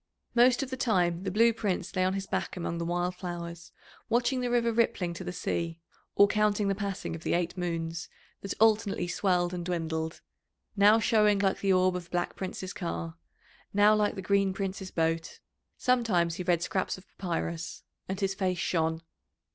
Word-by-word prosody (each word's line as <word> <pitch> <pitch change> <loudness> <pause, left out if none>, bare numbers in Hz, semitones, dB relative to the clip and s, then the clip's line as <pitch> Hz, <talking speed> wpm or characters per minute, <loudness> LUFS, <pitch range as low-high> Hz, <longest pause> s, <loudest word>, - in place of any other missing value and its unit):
Most 245 +2 +5
of 265 - -7
the 260 - -3
time 180 -6 +1
the - - 0
Blue 230 +4 +4
Prince 200 -5 -2
lay 185 - +2
on 185 +1 +1
his 195 0 -3
back - - -3
among 170 -1 -3
the 170 - -2
wild 175 +1 -1
flowers, 170 -2 -6 0.4
watching 245 +2 +2
the 245 - -1
river 235 -1 +2
rippling 220 -6 +1
to 170 - -7
the 180 - -4
sea 170 -1 -3 0.4
or 200 - +7
counting 210 -1 +2
the - - +2
passing 200 -1 -4
of 165 - -8
the - - 0
eight 175 0 -1
moons, 165 -1 -3 0.3
that 195 - -4
alternately 215 -4 +3
swelled 180 -1 +1
and 175 -1 -3
dwindled, 160 -2 -3 0.5
now 205 +2 +6
showing 210 -2 +4
like 195 -1 +1
the 195 - +1
orb 185 0 +3
of 180 -1 -4
the - - -23
Black 175 0 -2
Prince's 185 0 -5
car, 85 -1 -4 0.6
now 205 +1 +6
like 210 -1 +1
the 190 - -6
Green 195 0 +2
Prince's 195 -1 -4
boat. 165 -1 -1 0.4
Sometimes 215 -10 +2
he 175 - -5
read 175 -1 +2
scraps 190 +1 -1
of 185 - -15
papyrus, 170 -2 -3 0.3
and 190 0 -3
his 195 0 +1
face 185 -2 -1
shone. 160 -1 0
185 Hz, 185 wpm, -29 LUFS, 170-205 Hz, 0.6 s, or